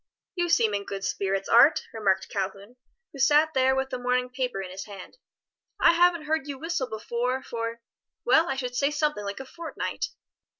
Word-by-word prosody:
"You 350 -1 -1
seem 225 -9 +3
in 200 0 -1
good 195 -1 -6
spirits, 195 0 -1
Art," 275 +7 +6
remarked 195 -4 +1
Calhoun, 200 +4 -5 0.4
who 280 - -10
sat 300 +4 +4
there 265 0 +3
with 265 0 -1
the 255 - -3
morning 250 0 0
paper 250 -5 -2
in 185 -1 -6
his 195 +1 -7
hand. 200 - -11 0.6
"I - - +6
haven't 340 -2 +3
heard 310 -2 -1
you 280 -2 -5
whistle 325 -2 -2
before 240 +4 -2
for 230 -1 -4 0.4
well 315 +7 +4
I 270 - 0
should 250 -2 -4
say 280 +3 +2
something 300 -6 -1
like 200 +3 -5
a 265 - -7
fortnight." 330 +5 -4
250 Hz, 185 wpm, -26 LUFS, 210-295 Hz, 0.6 s, Art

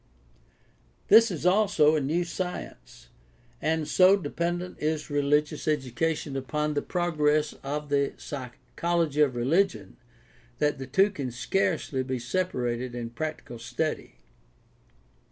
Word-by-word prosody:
This 225 +2 +8
is 170 -4 -5
also 180 -6 +4
a 155 - +1
new 160 +6 0
science, 170 - -6 0.5
and 160 -1 0
so 185 +1 +6
depend 175 +1 -2
ent 180 - -10
is 155 0 -2
religious 150 +2 +1
education 150 +1 -1
upon 150 +3 -2
the 145 - 0
progress 155 -4 +1
of 145 +2 -4
the 140 -1 +1
psychology* 145 +4 -2
of 135 -4 +3
religion 120 - 0 0.6
that 150 -2 0
the 135 - -6
two 195 +10 +3
can 140 -9 -4
scarcely 155 - -1
be 130 0 -2
separated 125 -4 -2
in 120 -1 -5
practical 140 -3 -5
study. 120 +7 -3
150 Hz, 120 wpm, -27 LUFS, 130-170 Hz, 0.6 s, This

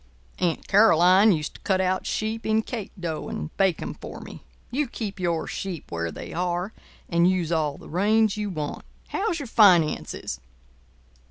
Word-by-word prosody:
Aunt 170 -3 -1
Caroline 195 0 +6
used 155 -4 -1
to - - -15
cut 190 -1 +1
out 185 0 0
sheep 220 +1 -2
in 220 0 +1
cake 220 -5 -6
dough 165 -3 -4
and 75 0 -6
bake 190 -4 +2
'em - - -4
for - - -9
me. - - -10 0.3
You 280 +3 0
keep 210 -4 -6
your 170 -3 0
sheep 185 -5 -6
where 85 0 -2
they - - -8
are, 180 +3 -2 0.3
and 170 +1 +3
use 180 -3 0
all 155 -3 0
the - - -13
range 210 +4 +2
you 210 -1 -3
want. 155 -5 -4 0.3
How's 405 -4 -1
your 285 - -5
finances?" 185 -9 +3
185 Hz, 170 wpm, -25 LUFS, 170-215 Hz, 0.3 s, Caroline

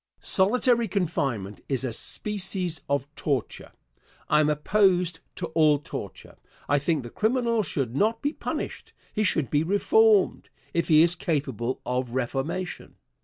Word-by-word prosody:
Answer. - - -17
Solitary 235 +4 +3
confinement 135 - -2
is 135 -2 -1
a 125 -3 -2
species 185 - 0
of 140 -2 0
torture. 140 -6 -3 0.6
I 150 - +4
am 150 0 +3
opposed 180 +2 +2 0.2
to 180 - -4
all 155 -2 +4
torture. 145 - -8 0.3
I 145 +1 +3
think 150 -1 0
the 120 - -9
criminal 230 0 +1
should 135 - -3
not 220 +8 +1
be 290 +2 -2
punished. - - -5 0.2
He 215 - -1
should 160 - +1
be 145 - +3
reformed, 205 +3 +3 0.2
if 170 - 0
he 155 -1 +6
is 170 0 +3
capable 135 - -2
of 125 -1 -2
reformation. 135 +8 -3
160 Hz, 145 wpm, -26 LUFS, 135-200 Hz, 0.6 s, he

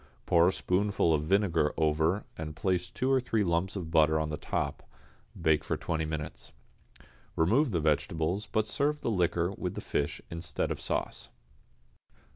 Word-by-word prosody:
Pour 85 0 +5
a - - +4
spoonful 95 -2 +1
of 75 -1 0
vinegar 85 -4 +2
over, 80 +5 +1
and 75 -1 -6
place 90 0 0
two 130 +7 -1
or 130 -1 +4
three 115 -3 0
lumps 85 +2 0
of 85 -5 -5
butter 80 -1 +4
on 80 0 -1
the - - -1
top; - - -3 0.6
bake 80 -1 +2
for - - -2
twenty 80 -1 -2
minutes. 75 -1 -6 0.8
Remove 120 - +3
the 90 -6 0
vegetables, 80 +5 0
but 110 -1 +2
serve 150 +6 0
the 115 - -1
liquor 85 -2 +1
with 100 - -4
the - - -3
fish 70 0 -2
instead 85 +1 -2
of - - -4
sauce. - - -3
85 Hz, 165 wpm, -30 LUFS, 80-100 Hz, 0.8 s, Pour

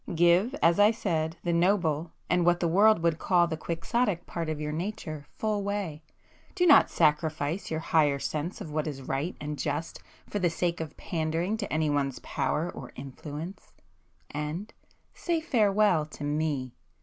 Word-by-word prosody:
Give, 175 - +4
as 170 +3 +5
I 205 +1 +7
said, 165 -7 -1
the 175 - 0
noble, 170 -3 +2 0.2
and 180 - +2
what 175 0 +3
the 170 - +1
world 200 +1 +5
would 165 -1 +2
call 175 -2 +3
the 165 -1 -3
quixotic 175 +4 -1
part 165 -2 -4
of 155 -1 -3
your 150 0 -3
nature 155 -3 -5
full 215 -2 0
way,—do 200 - -4
not 310 -5 +7
sacrifice 155 +2 +1
your 160 0 -2
higher 150 -4 +3
sense 155 +5 -3
of 155 - -6
what 155 +1 -1
is 135 -3 -5
right 140 +7 -2
and 150 0 -5
just 165 - -3 0.3
for 205 - -3
the 180 -2 +2
sake 170 +1 -1
of 160 -2 -7
pandering 165 +4 -1
to 205 -2 -5
anyone's 145 -4 0
power 160 +3 -1
or 125 - -9
influence,—and—say 155 - -7
farewell 210 - +3
to 155 - -9
me! 145 -4 -1
165 Hz, 155 wpm, -28 LUFS, 150-190 Hz, 0.3 s, I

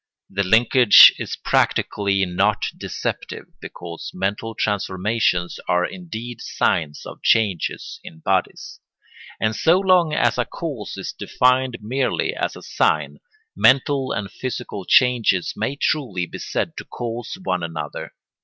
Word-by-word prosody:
The 100 - -1
linkage 115 +3 +7
is - - -4
practically 100 -1 +1
not 100 +4 0
deceptive, - - -5 0.2
because 85 -1 -8
mental 100 +4 -3
transformations 95 -2 -1
are 90 0 +2
indeed 120 -10 -7
signs 85 - -1
of - - -10
changes 100 -7 0
in 80 - -11
bodies; 80 - -2 0.6
and 110 0 0
so 170 +3 +3
long 185 -4 +3
as 120 -5 +1
a 120 - +1
cause 145 -11 -6
is - - -5
defined 125 -1 +1
merely 130 +5 -1
as - - -2
a - - -11
sign, - - 0 0.4
mental 135 0 +3
and 100 -3 -3
physical 125 -6 -5
changes 120 -7 +3
may 140 - -2
truly 125 - -1
be - - -9
said - - -2
to - - -7
cause 120 +5 -6
one 90 - -1
another. 80 -3 -6
110 Hz, 130 wpm, -21 LUFS, 95-130 Hz, 0.6 s, linkage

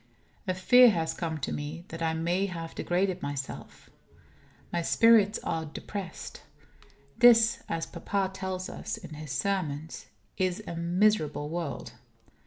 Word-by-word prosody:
A 185 - 0
fear 245 +6 +7
has 165 -6 0
come 165 -2 -3
to - - -2
me 150 +4 -5
that 165 +1 -7
I 160 -1 0
may 175 +4 0
have 165 -3 -6
degraded 185 +1 0
myself. 140 -1 -6 0.8
My 170 - +1
spirits 220 +3 +5
are 160 0 -2
depressed. 185 +3 -7 0.8
This, 235 -1 +6
as 165 0 -1
papa 195 -1 -2
tells 190 -1 -4
us 215 - -5
in - - -10
his 150 -2 -7
sermons, 160 +1 -2 0.3
is 185 +2 -1
a 170 - -5
miserable 170 -4 +1
world. 165 -3 -4
175 Hz, 135 wpm, -29 LUFS, 160-195 Hz, 0.8 s, fear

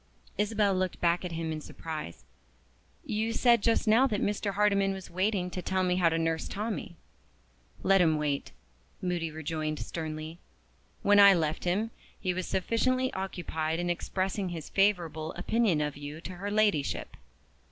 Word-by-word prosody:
Isabel 210 -1 +2
looked 185 -1 -1
back 170 +1 +2
at 180 -2 -4
him 165 -1 -3
in 155 -1 -4
surprise. 155 - -7 0.8
"You 220 +2 -1
said 235 -2 +4
just 230 +1 +2
now 230 +5 +5
that 210 -5 -1
Mr. 205 0 -1
Hardyman 200 -1 +3
was 190 -1 -8
waiting 185 0 0
to 180 - -4
tell 185 +1 0
me 180 0 +1
how 175 -2 +4
to 165 - 0
nurse 165 0 -1
Tommie." 210 -4 -4 0.9
"Let 195 -1 +5
him 160 -3 +3
wait," 145 -2 -2 0.5
Moody 175 -3 -1
rejoined 155 0 -3
sternly. 155 +1 -5 0.6
"When 205 0 +6
I 200 -1 +9
left 160 0 -1
him, 205 +6 0 0.3
he 185 -2 -1
was 185 0 -3
sufficiently 255 +7 +1
occupied 165 -4 -2
in 175 0 0
expressing 190 +2 -2
his 165 -3 -6
favorable 170 -6 +1
opinion 190 -3 +1
of 150 -1 -2
you 145 +2 -7
to 185 - -7
her 200 +3 -4
Ladyship." 205 -9 +1
180 Hz, 160 wpm, -29 LUFS, 160-205 Hz, 0.9 s, I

